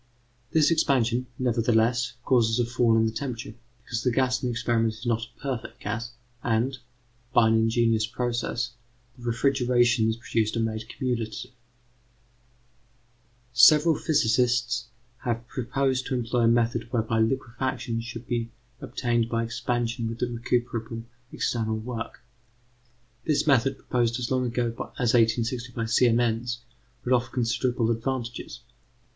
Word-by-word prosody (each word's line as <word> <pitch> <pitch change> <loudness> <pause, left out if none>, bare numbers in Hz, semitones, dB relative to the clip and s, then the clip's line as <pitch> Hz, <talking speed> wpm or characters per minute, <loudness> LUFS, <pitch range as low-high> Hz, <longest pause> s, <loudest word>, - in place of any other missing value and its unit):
This 160 0 +4
expansion, 125 -6 +2
nevertheless, 120 0 +2
causes 115 -3 +3
a 120 - +2
fall 120 -1 +2
in 110 - +4
the 110 - 0
temperature, 120 0 -5 0.3
because 115 -1 -3
the 125 - +2
gas 125 +1 +1
in 125 - -1
the - - -1
experiment 115 -2 0
is 115 +3 -11
not 115 -1 +1
a - - -30
perfect 130 -4 -5
gas, 115 +3 -4 0.3
and, 120 +3 0 0.6
by 115 -2 +6
an - - +3
ingenious 115 0 +2
process, 120 0 -2 0.4
the 120 -2 -12
refrigerations 120 -3 +2
produced 115 -1 -1
are - - +1
made 110 0 -3
cumulative. 120 -4 -3 2.0
Several 150 +7 +7
physicists 120 -4 +1 0.3
have 120 -1 -3
proposed 130 +1 -1
to 135 - -1
employ 120 -1 +1
a - - +5
method 115 0 +1
whereby 110 -2 0
liquefaction 120 0 -1
should 120 0 -7
be 115 -1 -2 0.3
obtained 120 -2 -1
by 115 -1 0
expansion 115 0 -2
with 115 +2 -4
recuperable 120 -1 -2 0.3
external 110 -2 -1
work. 115 +1 -6 1.0
This 150 -2 +2
method, 135 -2 +3
proposed 120 -2 0
as 120 0 -3
long 130 -1 +1
ago 120 0 0 0.3
as 120 -2 +2
1860 115 +1 +1
by 115 -1 -2
Siemens, 120 +1 +2 0.4
would 125 - +1
offer 120 -1 +2
considerable 120 -1 0
advantages. 120 0 -4
120 Hz, 130 wpm, -26 LUFS, 115-125 Hz, 2.0 s, Several